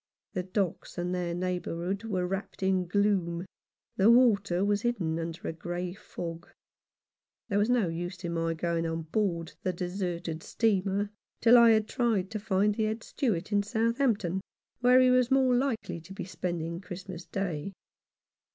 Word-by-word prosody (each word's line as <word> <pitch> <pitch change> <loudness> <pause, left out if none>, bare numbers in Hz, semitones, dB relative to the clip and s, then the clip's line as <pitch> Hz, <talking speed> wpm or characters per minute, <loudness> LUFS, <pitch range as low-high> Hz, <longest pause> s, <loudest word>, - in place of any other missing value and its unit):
The 185 - -1
docks 185 -1 -2
and 175 +1 -1
their 175 -1 -1
neighbourhood 180 +2 -2
were 185 -5 -1
wrapped 195 +1 -4
in 190 -1 +2
gloom, 185 -3 +1 0.5
the 200 +3 +5
water 200 -6 +4
was 205 0 +1
hidden 180 -10 -1
under 165 0 -5
a - - -2
grey 175 +2 -4
fog. 170 -3 -7 1.0
There 200 -1 +2
was 210 +3 +2
no 245 -6 +3
use 175 +3 -5
in 170 -1 -2
my 165 0 0
going 165 0 -1
on 165 0 -3
board 170 -1 -1
the 185 - 0
deserted 175 -2 -3
steamer 200 -1 0 0.3
till 235 +1 +7
I 235 -1 +8
had 220 -1 +4
tried 220 -6 0
to 215 - -3
find 205 0 +2
the 220 +1 0
Head 220 +1 -2
Steward 215 - -1
in 205 0 +3
Southamp 230 +3 +1
ton, 185 -1 -3 0.4
where 250 +1 +6
he 255 0 +6
was 250 -1 +4
more 265 -1 +4
likely 245 -9 -1
to 180 +4 -11
be 195 - -5
spending 170 -2 -3
Christmas 185 -2 -8
Day. 185 -3 -3
190 Hz, 165 wpm, -29 LUFS, 175-215 Hz, 1.0 s, I